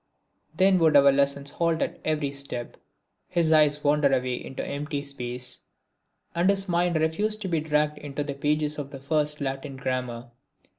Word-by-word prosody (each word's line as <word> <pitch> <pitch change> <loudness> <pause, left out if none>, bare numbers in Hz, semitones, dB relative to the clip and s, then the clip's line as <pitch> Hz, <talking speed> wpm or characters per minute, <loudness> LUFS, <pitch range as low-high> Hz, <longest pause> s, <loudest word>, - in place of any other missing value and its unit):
Then 190 0 +5
would 160 -3 +5
our 140 0 +7
lessons 140 0 0
halt 165 -1 0
at - - -4
every 150 -3 0
step; 140 -4 -5 0.5
his 170 -3 +1
eyes 150 -2 +4
wander 145 -1 +3
away 130 -1 +1
into 135 - -6
empty 145 0 -3
space; 125 -2 -5 0.7
and 175 +3 +2
his 195 -1 +1
mind 175 -1 +1
refuse 160 +8 +1
to 210 -3 -5
be 165 -3 +1
dragged 150 -1 0
into 145 0 -4
the 145 -1 -4
pages 150 +1 -1
of 140 -2 -5
the 140 -1 -9
first 150 +1 0
Latin 135 0 -4
Grammar. 125 -2 -3
150 Hz, 165 wpm, -26 LUFS, 140-160 Hz, 0.7 s, our